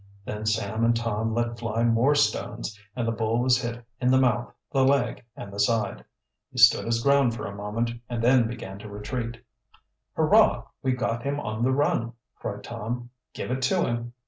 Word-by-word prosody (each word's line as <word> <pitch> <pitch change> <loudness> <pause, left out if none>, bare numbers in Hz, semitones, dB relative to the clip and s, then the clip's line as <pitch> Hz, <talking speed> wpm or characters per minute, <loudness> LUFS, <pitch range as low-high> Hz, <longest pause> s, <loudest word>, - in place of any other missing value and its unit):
Then 105 +1 -4
Sam 110 +1 0
and 115 0 +4
Tom 115 -1 -1
let 120 0 -1
fly 115 0 -1
more 120 +5 +3
stones, 145 -6 0 0.2
and 120 -2 -1
the - - +2
bull 115 0 0
was 125 0 +3
hit 120 -1 -5
in 125 - +2
the 130 - +5
mouth, 125 -2 +2 0.2
the 135 -3 +3
leg, 135 -1 +2
and 100 - -9
the 100 - -6
side. 105 -1 +1 0.5
He - - -12
stood - - +7
his 115 0 0
ground 140 -4 +4
for - - -5
a 100 - -5
moment 105 +4 -2 0.2
and 120 -2 -2
then 125 -1 +5
began 105 -5 -7
to 105 - -9
retreat. 115 +3 -4 0.8
"Hurrah! - - +4 0.2
we've 130 -1 0
got 120 -2 -1
him 140 +3 -2
on 110 -3 -4
the 130 +2 +3
run!" 130 -4 +1 0.2
cried 100 0 -6
Tom. 120 +2 -5 0.2
"Give - - -4
it 130 +1 -1
to 175 +8 +2
him!" 120 0 -3
115 Hz, 195 wpm, -26 LUFS, 110-125 Hz, 0.8 s, stood